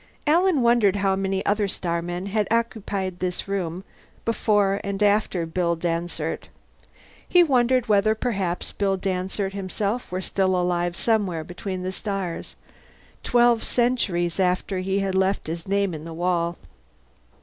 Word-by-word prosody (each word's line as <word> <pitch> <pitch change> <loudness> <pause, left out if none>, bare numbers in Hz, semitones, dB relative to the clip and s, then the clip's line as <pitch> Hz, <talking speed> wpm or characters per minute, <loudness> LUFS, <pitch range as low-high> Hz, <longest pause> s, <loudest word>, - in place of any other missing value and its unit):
Alan 330 -2 +3
wondered 235 -5 +4
how 195 -1 +2
many 190 0 -1
other 205 0 +2
starmen 175 0 -3
had 205 +1 0
occupied 205 -5 -1
the 180 -1 -2
room 185 -2 -3 0.4
before 205 -3 +2
and 200 +1 -1
after 205 -4 +2
Bill 170 +1 0
Dansert. 165 -1 -3 0.8
He 355 -1 +6
wondered 255 -4 +3
whether 215 +1 +3
perhaps 195 -7 -2
Bill 195 -1 0
Dansert 190 +1 -2
himself 200 +4 -3
were 185 - -1
still 190 0 +1
alive 175 -1 0
somewhere 200 -8 +1
between 180 +2 -5
the 185 - -2
stars, 195 -4 -4 0.7
twelve 240 -1 +3
centuries 200 -9 0
after 185 +1 +1
he 190 +2 0
had 195 -1 -1
left 190 +1 +1
his 165 +2 -5
name 200 -1 +1
in 155 -1 -6
the 165 0 -7
wall. 170 0 0
195 Hz, 140 wpm, -24 LUFS, 180-210 Hz, 0.8 s, He